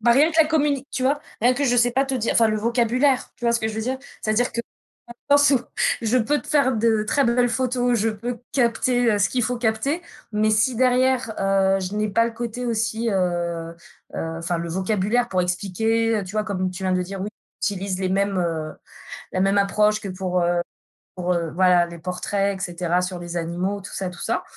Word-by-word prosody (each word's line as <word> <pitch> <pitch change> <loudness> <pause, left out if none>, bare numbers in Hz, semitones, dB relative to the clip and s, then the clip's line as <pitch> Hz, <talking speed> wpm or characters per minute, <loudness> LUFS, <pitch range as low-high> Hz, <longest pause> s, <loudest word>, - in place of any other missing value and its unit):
bah, 235 +1 +4
rien 295 +6 +5
que 320 0 +3
la 310 - +5
communi 290 -3 +1
tu 255 - -3
vois? 280 +3 +2 0.2
Rien 245 +2 +5
que, 285 +3 -1
je 245 -2 +2
sais 245 0 +4
pas 270 +2 +2
te 270 - -2
dire 230 -3 0
enfin 225 -1 +4
le 215 - 0
vocabulaire, 240 +4 +1
tu - - -9
vois 235 - +3
ce 235 - +1
que 220 - -1
je 220 - -5
veux 220 - -2
dire? 260 +3 -2 0.2
C'est-à-dire 220 +3 +1
que, 235 - -1 0.7
dans 285 - +6
le - - +4
sens 285 0 +5
ou, - - -15 0.4
je 230 +3 +2
peux 290 +6 +1
te - - -15
faire 280 -4 +3
de 220 -1 +2
très 280 +6 +2
belles 245 +1 +3
photos, 245 -1 0
je 225 +2 +1
peux 235 +3 -4
capter, 245 -1 +2
heu, 205 - +1
ce 200 - +3
qu'il 250 - -1
faut 245 +1 -1
capter, 240 +8 0 0.3
mais 215 +1 +2
si 215 +4 +2
derrière, 255 -1 +2
heu, 195 0 +2
je 185 +2 -4
n'ai 215 0 0
pas 230 +3 +3
le 235 - -4
côté 235 +1 -5
aussi, 225 0 -1
heu, 170 -3 -1 0.4
heu, 165 0 -4
enfin 170 +1 -2
le 170 - -4
vocabulaire 205 +6 0
pour 185 -4 0
expliquer, 220 +5 0
heu, 195 - -6
tu 185 - -9
vois, 215 0 0
comme 185 -3 -2
tu 190 - -8
viens 185 -1 0
de 180 0 +1
dire, 190 +1 -6
oui, 200 - -3 0.3
j'utilise 195 -2 -2
les 185 - 0
mêmes, 195 +1 0
heu, 160 -3 -2 0.6
la 185 - 0
même 195 +1 +2
approche 210 +2 +2
que 200 - -6
pour, 185 -1 -1
heu, 175 0 +1 0.5
pour, 180 -1 0
heu, 170 -2 -2
voilà, 180 -1 +4
les 170 0 -9
portraits, 195 +3 -2
et - - -7
cetera, 175 0 -1
sur 180 0 -3
les 175 0 -5
animaux, 180 +4 -2
tout - - -10
ça, 190 -2 -3
tout 180 - -12
ça. - - -1
215 Hz, 235 wpm, -23 LUFS, 185-245 Hz, 0.7 s, dans